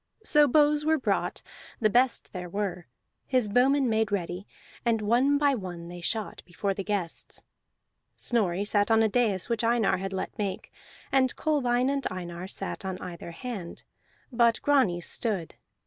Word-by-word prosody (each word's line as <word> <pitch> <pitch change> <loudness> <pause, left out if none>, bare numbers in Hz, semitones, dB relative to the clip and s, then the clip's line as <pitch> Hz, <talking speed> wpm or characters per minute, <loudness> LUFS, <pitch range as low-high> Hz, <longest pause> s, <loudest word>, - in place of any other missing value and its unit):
So 295 -7 +5
bows 295 +2 +4
were 315 +1 +3
brought, 265 - -1 0.4
the 215 - +4
best 250 +2 +2
there 180 -2 -5
were; 190 -2 -3 0.4
his 255 -4 +2
bowmen 260 +5 +3
made 220 -2 +1
ready, 185 0 -3 0.4
and 230 -2 +2
one 245 +7 +3
by 285 -1 +3
one 175 -7 -6
they 175 0 -8
shot 215 +5 -3
before 195 +3 -2
the 195 - -4
guests. 195 -5 -3 0.7
Snorri 200 -5 0
sat 205 0 +2
on 225 0 +5
a - - +4
dais 215 -5 +1
which 235 -1 -1
Einar 230 -4 +2
had 195 +1 -4
let 190 - -4
make, 195 -2 -3 0.4
and 260 -2 +3
Kolbein 255 -5 +1
and 275 -1 -1
Einar 175 -1 -6
sat 195 - -4
on 190 -1 -3
either 170 -2 -8
hand; 190 -1 -7 0.5
but 235 -2 +3
Grani 255 -12 +3
stood. 190 -3 -2
215 Hz, 160 wpm, -28 LUFS, 185-250 Hz, 0.7 s, So